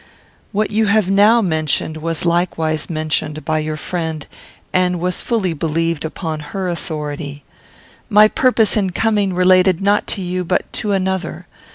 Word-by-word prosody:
What 215 0 -1
you 215 +1 +2
have 200 -2 +2
now 215 +4 +5
mentioned 155 -2 0
was 165 +1 -2
likewise 165 -3 0
mentioned 155 -1 -2
by 155 -1 0
your 155 0 -3
friend, 160 -2 -4 0.5
and 180 -1 +1
was 180 +1 -1
fully 210 -8 0
believed 165 0 -1
upon 160 0 -4
her 185 +5 -4
authority. 150 -4 -5 0.7
My 210 0 +7
purpose, 225 -3 +2
in 195 -4 0
coming, 210 -1 +1
related 185 0 +4
not 200 +1 +1
to - - -4
you, 180 0 -2
but 180 +1 0
to 210 - -2
another. 190 -1 -2
180 Hz, 150 wpm, -18 LUFS, 155-200 Hz, 0.7 s, My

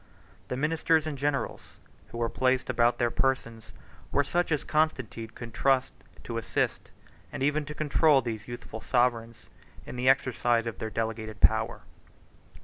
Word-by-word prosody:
The 125 - -3
ministers 155 +2 +2
and 155 -2 -3
generals, 140 0 -1 0.5
who - - -9
were 120 0 +1
placed 130 +2 +1
about 120 0 +3
their 120 -1 +1
persons, 115 -4 -1 0.4
were 145 - +3
such 175 +4 0
as 150 -1 +1
Constantine 130 -8 0
could 115 +1 -10
trust 135 0 +2 0.3
to - - -3
assist, - - -2 0.4
and - - -4
even 150 +1 +1
to 150 +1 -7
control, 150 -1 +4
these 110 -3 -5
youthful 120 -2 -7
sovereigns 115 -2 0 0.4
in - - -7
the 125 +1 +3
exercise 120 -3 +2
of 115 - -5
their 110 - -3
delegated 110 -2 -4
power. 110 0 +3
125 Hz, 150 wpm, -28 LUFS, 115-145 Hz, 0.5 s, control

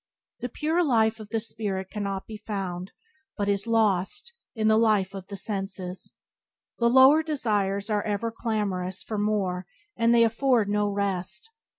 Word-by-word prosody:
The 245 - -4
pure 320 +7 0
life 225 -6 +2
of 215 -1 -10
the 225 - 0
spirit 200 -4 -4
cannot 200 -2 -3
be 220 - -8
found; 195 -4 -5 0.5
but 205 -1 -1
is 200 +1 +1
lost, 225 - +1 0.2
in 215 -1 +1
the 220 0 +5
life 210 -4 +2
of 190 -1 -8
the 200 - -7
senses. 195 -2 -4 0.6
The 235 -1 +4
lower 265 +5 +7
desires 210 -10 -1
are 210 -1 +2
ever 215 +2 -2
clamorous 190 -5 -2
for 215 -2 -3
more, 195 -4 -1 0.3
and 230 0 +3
they 235 -1 +6
afford 230 -1 +2
no 205 0 +1
rest. 200 - -2
210 Hz, 160 wpm, -26 LUFS, 195-230 Hz, 0.6 s, lower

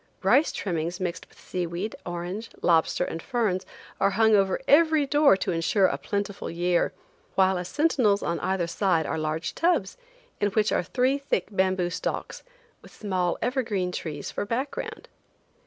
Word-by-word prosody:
Rice 255 +11 +4
trimmings 175 -1 -3
mixed 180 -1 -4
with - - -22
sea 180 -1 -3
weed, 175 +6 -4
orange, 175 +6 -5
lobster 165 +1 +3
and 165 - -5
ferns 200 -7 -1 0.3
are - - +4
hung 220 +2 +4
over 195 -2 +2
every 315 0 +5
door 290 -6 +5
to 190 - -2
insure 175 +4 +2
a - - 0
plentiful 200 -1 -3
year, 175 +1 +1 0.4
while 190 0 +4
as 180 - -5
sentinels 250 - +2
on 170 -1 -1
either 190 -2 0
side 170 -1 +1
are - - -2
large 155 +1 -2
tubs, 330 - +1 0.4
in 205 - +2
which 215 -1 +2
are - - +2
three 255 +10 +1
thick 240 -10 -1
bamboo 185 -2 +1
stalks, - - -4 0.4
with - - -15
small 185 -4 -1
evergreen 225 -8 -1
trees 150 -5 -5
for - - -3
background. 245 +7 -4
190 Hz, 160 wpm, -26 LUFS, 175-225 Hz, 0.4 s, every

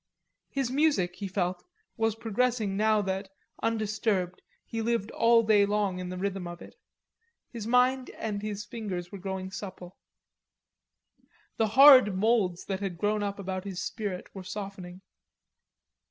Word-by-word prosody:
His 270 -3 -2
music, 260 - +2
he 200 - -4
felt, 180 -1 -2 0.3
was 225 -1 0
progressing 225 -2 0
now 215 0 +3
that, 190 +1 -3 0.3
undisturbed, 215 -4 -1 0.2
he 225 - -4
lived 230 -2 -1
all 230 0 +4
day 215 -2 +5
long 200 -2 0
in 180 0 -5
the 185 - -5
rhythm 190 -1 -3
of 175 0 -8
it; - - -12 0.8
his 225 -3 -6
mind 250 +2 +3
and 210 -2 -3
his 210 -1 -4
fingers 185 -6 -5
were 200 - -7
growing 190 0 -5
supple. 185 -3 -8 1.6
The 225 - +2
hard 265 -8 +9
moulds 195 -4 +1
that 195 -1 -3
had 195 -4 -4
grown 210 +4 0
up 200 -1 -2
about 190 -1 -4
his 190 -3 -5
spirit 205 -5 -5
were 195 - -7
softening. 190 -2 -7
205 Hz, 145 wpm, -28 LUFS, 185-225 Hz, 1.6 s, hard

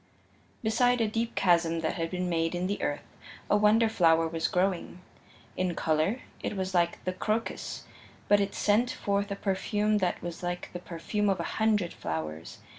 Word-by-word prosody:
Beside 245 +3 +3
a 225 - +2
deep 225 +2 -2
chasm 170 -3 +3
that 160 - 0
had 165 -2 -2
been 180 0 -2
made 165 0 0
in 175 +1 -1
the 200 +2 -2
earth 145 - -2 0.5
a - - +6
wonder 210 +2 +5
flower 165 -6 +4
was 165 0 -1
growing 180 -1 -1 0.6
in 180 -2 -1
color 160 +10 +1 0.2
it 210 - -3
was 190 0 -2
like 170 -1 +1
the 185 - -1
crocus, 215 +4 -2 0.4
but 205 - +5
it 200 0 -1
sent 215 +4 +2
forth 200 -4 -1
a 200 - -2
perfume 210 +2 0
that 180 -2 0
was 175 -1 -5
like 175 0 -4
the 175 - -4
perfume 180 +4 -2
of 195 - +1
a - - -1 0.2
hundred 210 -5 +2
flowers. 80 0 -5
185 Hz, 180 wpm, -29 LUFS, 170-210 Hz, 0.6 s, a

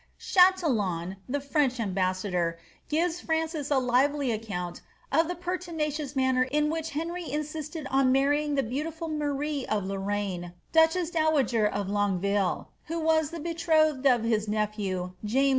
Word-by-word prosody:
*' - - -38
Chatillon, 225 - +2
the 285 +3 0
French 280 -3 0
ambassador, 185 -4 0 0.3
gives 335 +3 +1
Francis 320 -2 -1
a 285 - +3
lively 260 +2 +2
account 195 -6 -4 0.3
of 320 +3 +3
the 355 - -3
pertinacious 320 -5 -3
manner 260 -1 +2
in 300 +4 +1
which 325 0 -3
Henry 335 +3 -4
insisted 305 +1 -4
on 265 -1 +4
marrying 290 +2 +2
the 275 - +2
beauti 280 +8 -3
ful 325 +1 -6
Marie 295 -1 -2
of 205 -3 -1
Lorraine, 195 -2 -3 0.2
duchess 325 +1 +3
dowager 295 -9 +2
of 205 -1 -2
Longueville, 200 -1 0
who 330 +2 -3
was 315 -2 +2
the 335 - -6
betrothed 315 -4 +2
of 245 -4 +4
his 220 -2 +1
nephew, 205 -4 -2
James 210 +1 -4
V. 275 - +4
275 Hz, 150 wpm, -28 LUFS, 210-315 Hz, 0.3 s, on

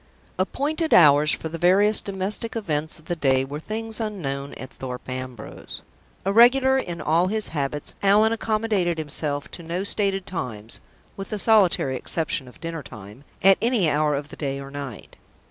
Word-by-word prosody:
Appointed 305 - 0
hours 150 -2 +6
for - - -1
the 165 +1 -6
various 200 +5 +4
domestic 200 +4 -3
events 160 -8 -2
of 160 - -15
the 175 - -2
day 135 -4 +2
were 145 +2 -6
things 220 +5 -5
unknown 140 -11 -4
at 130 - -9
Thorpe 125 -1 -7
Ambrose. 130 -3 -7 0.4
Irregular 245 +6 +5
in 175 -9 -5
all 165 +4 +2
his 215 +2 -1
habits, 145 -1 -3
Allan 210 +3 +4
accommodated 215 -6 0
himself 145 -2 -2
to - - -6
no 170 +3 -3
stated 195 -2 +1
times 115 - -5 0.3
(with 195 - -7
the 215 - -3
solitary 190 - +3
exception 155 -2 -2
of 125 - -15
dinner 165 -1 -5
time) 105 +1 -12 0.2
at 195 0 +6
any 230 -7 +2
hour 150 0 +1
of 145 +1 -5
the - - -10
day 140 -2 -3
or 140 0 -9
night. 140 -7 -8
170 Hz, 165 wpm, -24 LUFS, 140-210 Hz, 0.4 s, hours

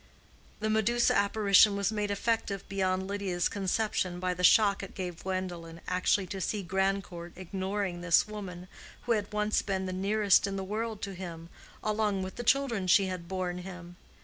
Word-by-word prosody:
The 215 - 0
Medusa 225 +2 +3
apparition 200 0 +5
was 200 +1 0
made 210 -1 -1
effective 200 -1 -1
beyond 190 -1 -1
Lydia's 195 -3 -1
conception 190 -2 -1
by 180 0 0
the 180 0 -5
shock 200 +2 +5
it 195 - -9
gave 180 -3 -5
Gwendolen 175 -3 -4
actually 185 +2 +1
to 195 +1 -6
see 205 +3 -2
Grandcourt 190 -2 -2
ignoring 190 0 -3
this 175 +2 +4
woman 185 -4 -7 0.4
who 240 - -2
had 210 -3 0
once 210 0 +1
been 190 -2 -2
the 185 - -3
nearest 200 +1 +3
in 195 - -3
the 195 - -3
world 215 +2 -4
to 195 - -3
him, 170 -3 -8 0.3
along 210 -2 0
with 185 0 -6
the 240 - -4
children 235 -6 +2
she 195 +2 +5
had 185 -2 -5
borne 180 -1 -3
him. 180 -1 -9
195 Hz, 175 wpm, -30 LUFS, 180-210 Hz, 0.4 s, apparition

